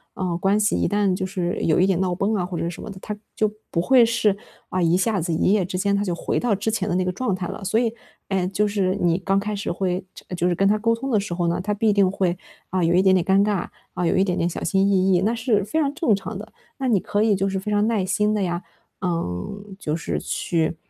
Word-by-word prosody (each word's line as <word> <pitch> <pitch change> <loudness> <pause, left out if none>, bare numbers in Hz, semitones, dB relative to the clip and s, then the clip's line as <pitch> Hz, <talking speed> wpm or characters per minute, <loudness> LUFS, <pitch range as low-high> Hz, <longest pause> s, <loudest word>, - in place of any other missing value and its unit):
嗯， 180 -3 -2
关 195 +3 +2
系 210 0 +2
一 - - +1
旦 205 -2 +1
就 - - -3
是 180 -2 -2
有 160 - +2
一 185 - +5
点 190 -3 +1
闹 180 -2 0
崩 200 +4 0
啊 195 -4 0
或 180 -1 -5
者 - - -2
是 170 - -2
什 - - -9
么 - - -7
的， 195 - -8
它 210 - -5 0.2
就 215 -1 +1 0.2
不 170 - 0
会 250 +4 +6
是， 225 -3 +2 0.3
啊， 185 - -1
一 170 0 +3
下 205 +1 +1
子 170 +1 -2
一 160 - +2
夜 205 -2 +3
之 185 0 -4
间， 200 +1 +1
它 200 - 0
就 180 - -1
回 - - -1
到 235 -4 +1
之 215 +3 -1
前 210 -3 -1
的 175 - 0
那 185 - +2
个 180 - 0
状 200 +3 -1
态 180 -1 -4
了。 200 0 -7
所 220 +4 +1
以， 230 -2 0 0.4
诶， 190 -2 0
就 210 +2 +1
是 195 -2 0
你 175 -1 +3
刚 195 +1 +1
开 210 +1 -3
始 200 - -3
会 180 +1 -1
就 - - -13
呃， 180 - -4
就 175 0 +1
是 175 - +1
跟 195 +2 +2
他 210 +1 +3
沟 230 +1 +2
通 265 +4 -5
的 215 - +3
时 200 -3 -4
候 175 -1 0
呢， 170 - 0
他 210 +3 -1
必 210 +1 +2
定 200 -2 +4
会， 185 -2 0 0.3
啊， 185 -1 0
有 170 +1 +3
一 180 - +5
点 190 -1 +5
点 180 - +2
尴 195 +1 +4
尬， 205 -4 0 0.3
啊， 180 - -1
有 - - +2
一 190 - +4
点 180 -2 -1
点 170 - +1
小 - - -5
心 195 0 +2
翼 190 -1 +3
翼， 180 - +3
那 215 +4 +1
是 225 -3 +1
非 260 +11 -1
常 280 -1 +1
正 245 - +2
常 200 +1 -6
的。 210 - -9 0.3
那 270 - -2
你 220 -6 +3
可 205 +3 0
以 220 -2 +3
就 195 +1 0
是 190 0 -2
非 210 +3 -4
常 205 0 +2
耐 215 -5 +1
心 210 +2 +1
地 210 - 0
呀， 175 -1 -2 0.4
嗯， 180 - -3
就 150 - -2
是 85 - -3
去， 165 - -1
195 Hz, 315 characters per minute, -23 LUFS, 180-210 Hz, 0.4 s, 会